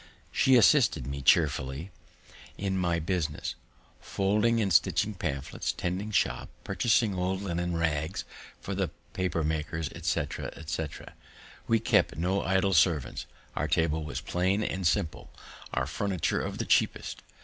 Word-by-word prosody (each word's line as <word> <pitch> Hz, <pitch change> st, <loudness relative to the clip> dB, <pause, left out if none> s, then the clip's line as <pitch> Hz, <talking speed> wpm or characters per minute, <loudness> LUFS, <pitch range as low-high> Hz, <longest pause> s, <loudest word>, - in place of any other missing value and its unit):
She 130 Hz, -, +4 dB
assisted 125 Hz, +1 st, +5 dB
me 70 Hz, 0 st, -4 dB
chearfully 70 Hz, +5 st, +2 dB, 0.7 s
in 95 Hz, -1 st, -1 dB
my 90 Hz, -2 st, +1 dB
business, 85 Hz, -1 st, -2 dB, 0.5 s
folding 105 Hz, +4 st, +1 dB
and 100 Hz, -4 st, +1 dB
stitching 105 Hz, +6 st, +3 dB
pamphlets, 70 Hz, -7 st, -3 dB
tending 95 Hz, +4 st, -3 dB
shop, 105 Hz, -, 0 dB
purchasing 115 Hz, -3 st, +2 dB
old 95 Hz, +1 st, -1 dB
linen 85 Hz, -2 st, -1 dB
rags 80 Hz, +2 st, -1 dB, 0.3 s
for 100 Hz, -, -5 dB
the 95 Hz, -3 st, -1 dB, 0.2 s
paper 90 Hz, -3 st, -1 dB
makers, 80 Hz, -1 st, -2 dB
etc., -, -, -2 dB
etc. 80 Hz, -1 st, -5 dB, 0.5 s
We 115 Hz, -, +3 dB
kept 115 Hz, -, +2 dB
no 95 Hz, +4 st, +1 dB
idle 95 Hz, +1 st, +2 dB
servants, 80 Hz, -6 st, +2 dB, 0.3 s
our -, -, 0 dB
table 80 Hz, -1 st, +1 dB
was 75 Hz, -2 st, -4 dB
plain 95 Hz, +4 st, 0 dB
and 95 Hz, -4 st, 0 dB
simple, 85 Hz, -2 st, -1 dB, 0.4 s
our 60 Hz, -, 0 dB
furniture 90 Hz, +4 st, -1 dB
of -, -, -4 dB
the -, -, -2 dB
cheapest. -, -, +1 dB
90 Hz, 135 wpm, -29 LUFS, 80-100 Hz, 0.7 s, assisted